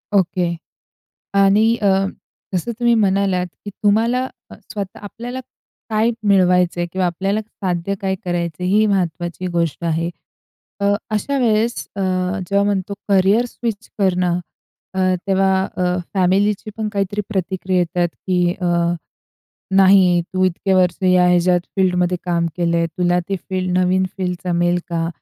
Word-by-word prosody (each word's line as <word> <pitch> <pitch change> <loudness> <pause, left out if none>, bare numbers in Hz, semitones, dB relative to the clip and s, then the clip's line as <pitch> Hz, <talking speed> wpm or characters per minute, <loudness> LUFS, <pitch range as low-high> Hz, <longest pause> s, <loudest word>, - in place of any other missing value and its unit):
Okay. 180 -2 +1 0.9
आणि 210 +4 +4
अ, 205 - +2 0.7
जसं 185 +7 -1
तुम्ही 240 -1 +3
म्हणालात, 195 -3 +2 0.2
की 205 - -5
तुम्हाला 230 +5 +2 0.3
अ, - - -9 0.2
स्वतः 200 -2 -5
आपल्याला 240 +5 -7 0.5
काय 220 +2 +2 0.2
मिळवायचं 180 -2 +3
आहे 175 - 0
किंवा 185 -1 0
आपल्याला 195 +5 -1
साध्य 195 -3 -3
काय 190 -1 0
करायचं 175 -1 -2
आहे? 180 - 0
ही 215 +1 +4
महत्वाची 180 -2 -1
गोष्ट 170 0 -1
आहे. 165 +1 0 0.7
तर 200 0 +3 0.2
अशा 275 +7 0
वेळेस 230 0 +2 0.2
अ, 200 - -3 0.5
जेव्हा 200 0 +3
म्हणतो 200 -1 -1 0.2
करिअर 200 +5 +4
स्विच 230 -2 -5
करणं, 180 -2 +2 0.5
अ, 190 - -2 0.3
तेव्हा 195 0 +3 0.2
अ, 180 0 +1 0.2
फॅमिलीची 200 +3 +1
पण 215 -1 -2
काहीतरी 200 +1 -1
प्रतिक्रिया 190 -1 -1
येतात, 175 0 +1 0.2
की 180 -1 +2
अ, - - 0 1.1
नाही 190 -2 +6
तू 185 0 +1
इतके 185 +2 0
वर्ष 180 -2 +3
ह्या 180 -1 +4
याच्यात 180 0 +3 0.2
फील्डमध्ये 180 -2 +2
काम 170 -1 +1
केलं 170 -1 +1
आहे. 170 - +2
तुला 180 0 +2
ती 195 - 0
फील्ड 185 -1 0
नवीन 185 +1 +2
फील्ड 180 -1 -1
जमेल 175 0 +2
का? 165 -1 -1
185 Hz, 145 wpm, -19 LUFS, 180-200 Hz, 1.1 s, नाही